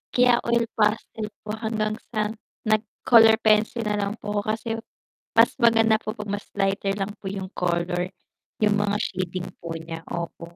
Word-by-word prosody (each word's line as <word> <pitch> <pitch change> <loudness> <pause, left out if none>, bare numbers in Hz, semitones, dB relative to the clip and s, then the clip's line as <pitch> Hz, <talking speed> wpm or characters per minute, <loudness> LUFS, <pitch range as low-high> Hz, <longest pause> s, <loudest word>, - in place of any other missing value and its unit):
Kaya 245 -1 +5
oil 235 0 +3
pastel 215 0 0 0.2
po 210 - -5
hanggang 215 -1 -1 0.2
sa 210 0 +1 0.3
nag-color 220 +1 +5
pencil 220 +2 +3
na 210 -1 -1
lang 200 +1 -1
po 210 -2 -3
ako - - -1
kasi 230 +1 -8 0.7
mas - - +6
maganda 225 -2 +5
po 215 - -5
'pag 210 -1 -6
mas 205 0 -4
lighter 195 0 0
lang 200 0 -2
po 195 - -7
'yung 190 -1 -5
color, 175 0 -1 0.6
'yung 210 -1 +4
mga 205 0 +1
shading 185 -2 -3
po 165 -1 -6
niya, 165 0 -6
opo. 170 0 -6
210 Hz, 165 wpm, -25 LUFS, 190-220 Hz, 0.7 s, mas